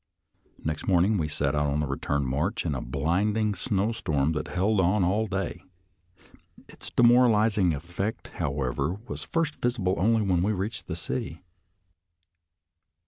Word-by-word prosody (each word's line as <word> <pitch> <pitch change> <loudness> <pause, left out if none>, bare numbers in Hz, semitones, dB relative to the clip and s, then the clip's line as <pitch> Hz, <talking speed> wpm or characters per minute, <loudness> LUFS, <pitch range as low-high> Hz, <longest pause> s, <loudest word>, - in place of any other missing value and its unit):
Next 75 -1 -3
morning 95 +3 +3
we 80 - 0
set 70 -1 -1
out 75 0 +1
on 70 +1 0
the 75 - 0
return 70 +1 -1
march 75 - -1
in 80 - 0
a 65 - -3
blinding 100 - 0
snowstorm 95 -7 0
that 75 -1 -3
held 100 +3 +1
on 95 +2 +3
all 105 +5 +1
day. 95 -3 -3 1.1
Its - - -10
demoralizing 115 -6 +4
effect, 90 +8 -4
however, 70 0 -1
was - - -5
first 165 -2 -2
visible 115 -7 0
only 110 +4 +3
when 90 -3 +1
we 105 +4 +1
reached 100 +3 -4
the - - -3
city. 80 +5 -5
90 Hz, 140 wpm, -27 LUFS, 75-105 Hz, 1.1 s, demoralizing